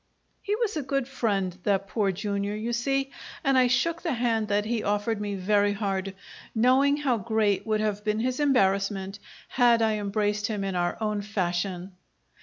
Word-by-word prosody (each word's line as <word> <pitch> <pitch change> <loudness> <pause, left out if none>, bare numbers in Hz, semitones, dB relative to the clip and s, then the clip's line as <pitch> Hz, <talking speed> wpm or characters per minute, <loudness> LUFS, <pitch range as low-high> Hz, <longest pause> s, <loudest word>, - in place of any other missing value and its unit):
He 410 - -1
was 440 -2 -1
a 305 - -1
good 275 -1 -1
friend, 200 -9 -1
that 195 0 0
Poor 200 -1 0
Jr., 200 +1 -2
you 225 +3 -3
see, 270 +3 0 0.3
and 275 -1 +3
I 255 -1 +5
shook 325 +7 +1
the 330 -5 -1
hand 230 -3 0
that 205 0 +1
he 230 0 -1
offered 205 +1 -1
me 205 -1 -3
very 205 +2 +2
hard, 195 -2 -2 0.4
knowing 260 +5 +4
how 270 -5 +1
great 215 -1 0
would 215 -1 +1
have 210 -1 -1
been 215 0 0
his 255 +2 -1
embarrassment 195 -7 +1 0.3
had 240 -2 +4
I 215 -1 +1
embraced 210 +1 -1
him 210 -3 -3
in 195 -1 -2
our 175 0 0
own 210 -2 -1
fashion. 185 -2 -2
215 Hz, 180 wpm, -27 LUFS, 200-245 Hz, 0.4 s, I